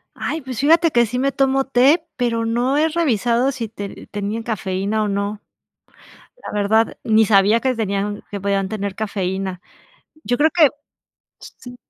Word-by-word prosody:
Ay, 320 - -3
pues 255 -4 -6
fíjate 325 +3 +4
que 240 -2 +4
sí 250 +3 -3
me 275 +1 +1
tomo 270 0 +1
té, 275 +6 +3
pero 230 -2 -1
no 240 +5 0
he 315 +2 +3
revisado 250 -5 +1
si 235 -5 -5
te 200 -2 -8
tenían 210 +2 -4
cafeína 205 -1 -2
o - - -1
no, 200 +1 -3 1.0
la - - -6
verdad, 210 +2 +1
ni 220 0 +4
sabía 205 +2 +4
que 260 +1 0
tenían 205 -1 -2
que 200 - -4
podían 195 0 -1
tener 200 -2 -4
cafeína, 190 -3 -3 0.6
yo 245 - 0
creo 315 +2 +4
que 315 -5 +5 0.7
sí. 245 0 -12
225 Hz, 160 wpm, -20 LUFS, 200-260 Hz, 1.0 s, que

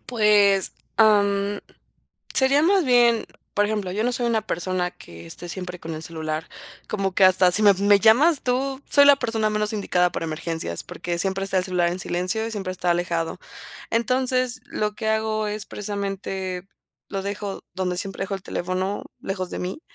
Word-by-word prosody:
Pues, 210 -4 +3 0.2
am, 205 -2 +3 0.7
sería 275 +3 +4
más 375 0 +3
bien, 240 -2 +4 0.3
por 205 - +3
ejemplo, 210 -4 -2
yo 215 +3 -1
no 245 - +1
soy 240 0 -1
una 225 -2 +1
persona 180 0 -1
que 85 - -13
esté 175 - -8
siempre 180 0 -6
con 165 0 -6
el 155 - -6
celular. 160 -1 -4 0.4
Como 195 -3 -2
que 190 - +5
hasta 185 -1 +5
si 215 - +2
me 205 -1 +8
me 200 +1 +4
llamas 275 - +5
tú, 265 +2 -1
soy 285 -1 +6
la 285 -1 +8
persona 225 -4 0
menos 210 0 -1
indicada 180 -4 +1
para 165 - -3
emergencias, 160 - -3
porque 175 -1 -4
siempre 195 +1 -1
está 195 -1 +1
el 180 - 0
celular 180 -2 +1
en 180 - -4
silencio 185 +6 -1
y - - -4
siempre 195 -4 -4
está 180 -1 -1
alejado. 170 -1 -1 0.5
Entonces, 255 +2 +1
lo 210 0 -2
que 220 +1 -3
hago 220 0 0
es 210 -1 -3
precisamente 195 -3 -4 0.4
lo 195 -1 -3
dejo 200 0 -4
donde 180 -1 -2
siempre 195 0 -3
dejo 195 - -4
el 195 - -6
teléfono, 185 +3 -3 0.2
lejos 185 -2 -4
de - - -5
mí. 185 - -4
200 Hz, 180 wpm, -23 LUFS, 180-220 Hz, 0.7 s, me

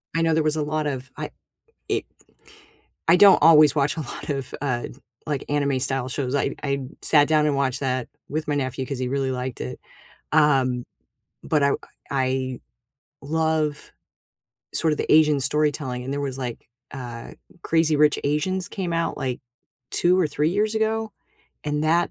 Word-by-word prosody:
I 165 - +2
know 165 -1 +2
there 155 0 +2
was 155 0 +1
a 155 - 0
lot 155 0 -1
of 130 -2 -5
I - - -5 0.6
it - - 0 1.0
I 170 - +7
don't 200 +1 +8
always 155 -2 +7
watch 140 +2 +1
a - - -3
lot 150 +1 -6
of, 135 -3 -3
uh, 125 -4 -2 0.4
like, 145 -3 -2
anime 140 -2 +1
style 130 -1 0
shows, 130 0 -3
I 140 - 0
I 140 -1 0 0.2
sat 145 -2 +5
down 155 -1 +3
and 150 - +1
watched 135 -2 0
that 130 -3 -1 0.2
with 155 +2 -3
my 145 - +1
nephew, 130 -1 -2
'cause 135 -1 -4
he 130 - -2
really 135 0 -1
liked 125 -1 -4
it, 65 +1 -5 0.5
um, 130 -4 +3 0.6
but, 150 -2 +1
I 140 - +3 0.4
I 130 -1 -1 0.6
love, 155 0 -1 0.8
sort 160 -1 +3
of 150 - -2
the - - -2
Asian 150 -2 +5
storytelling, 145 -3 0
and 135 - -4
there 145 - -2
was, 135 -2 -3
like, 120 -4 -6 0.2
uh, 120 -3 -7 0.3
Crazy 160 -1 +2
Rich 150 0 +4
Asians 180 +6 0
came 180 -4 -4
out, 165 0 -1
like, 125 -2 -3 0.5
2 180 +1 +3
or 180 - +3
3 150 +1 0
years 210 +4 0
ago? 220 0 0 0.5
And 150 0 -1
that 170 +2 +2
145 Hz, 175 wpm, -24 LUFS, 130-155 Hz, 1.0 s, don't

